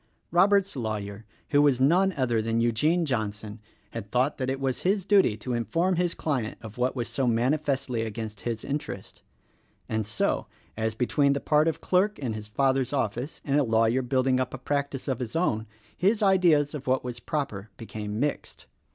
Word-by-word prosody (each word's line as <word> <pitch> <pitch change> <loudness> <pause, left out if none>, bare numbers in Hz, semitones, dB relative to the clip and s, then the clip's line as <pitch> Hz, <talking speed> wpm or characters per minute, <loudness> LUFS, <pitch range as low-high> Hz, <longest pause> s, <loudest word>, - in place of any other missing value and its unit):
Robert's 195 +2 +4
lawyer 110 -3 -4
— - - -37
who 145 -1 +5
was 140 -4 +4
none 175 +8 +4
other 120 -4 +1
than 115 +1 0
Eugene 150 +10 +2
Johnson— 110 -4 -3 0.3
had 100 - -6
thought 125 +6 +1
that 130 0 -1
it 135 0 -2
was 135 -2 -1
his 195 0 +1
duty 195 - +4
to 125 +3 -4
inform 165 - +1
his 175 -1 0
client 130 -8 -2
of 110 +1 -10
what 125 +2 +1
was 120 -3 -2
so 125 +2 -1
manifestly 130 +1 0
against 110 -1 -5
his 115 -2 -3
interest 145 -8 -5 0.7
and 110 -1 -2
so, 105 - 0 0.3
as 110 0 -1
between 140 +4 +2
the 140 - -1
part 150 +2 +3
of 165 - -1
clerk 195 +3 +2
in 125 -6 -3
his 105 -1 -6
father's 135 +3 +1
office 130 +1 -2
and 145 0 +2
a - - +3
lawyer 115 +1 +2
building 130 0 +1
up 130 0 -2
a - - -6
practice 140 +1 -2
of 130 -3 -1
his 120 0 -5
own, 115 -10 0 0.3
his 210 +4 +2
ideas 175 -7 +4
of 140 -3 -7
what 130 0 +2
was 125 -1 -5
proper 115 -7 -3
became 105 -1 -5
mixed. 145 +1 -3
130 Hz, 185 wpm, -27 LUFS, 115-150 Hz, 0.7 s, who